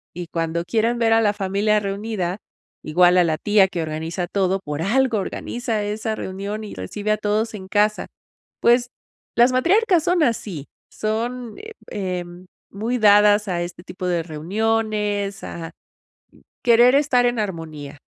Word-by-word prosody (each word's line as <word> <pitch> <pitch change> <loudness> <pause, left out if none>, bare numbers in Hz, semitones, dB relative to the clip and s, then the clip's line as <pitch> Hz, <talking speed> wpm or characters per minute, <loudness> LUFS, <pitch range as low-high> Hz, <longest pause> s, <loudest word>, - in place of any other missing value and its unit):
Y 175 -1 -6
cuando 165 0 -2
quieren 230 +5 0
ver 230 -1 +2
a 225 - +5
la 205 -2 +2
familia 205 +1 +1
reunida, 200 -2 -3 0.4
igual 175 +3 +4
a 180 - +6
la 160 -2 0
tía 205 -2 +4
que 180 -2 -4
organiza 160 +3 -3
todo. 190 0 0
Por 150 +1 -4
algo, 245 +4 +2
organiza 225 +2 -3
esa 215 +2 -2
reunión, 200 +2 -5
y 210 - -8
recibe 205 - -3
a 215 - +2
todos 215 +2 -1
en 190 -2 -9
casa. 210 +2 +1 0.6
Pues, 240 +1 +4 0.5
las 240 +2 +5
matriarcas 350 - +3
son 350 -2 +2
así. 200 - -2 0.3
Son, 230 +2 -3
eh, 440 +1 -10 0.2
em, 180 -2 -5 0.3
muy 230 +5 -2
dadas, 210 0 +5
a 175 -1 -1
este 175 0 -8
tipo 185 0 -6
de 175 -2 0
reuniones. 205 +4 -1
A 165 -1 -7 0.9
querer 240 +2 +6
estar 275 -4 +3
en 240 -1 +1
armonía, 160 -7 -5
205 Hz, 150 wpm, -22 LUFS, 180-225 Hz, 0.9 s, a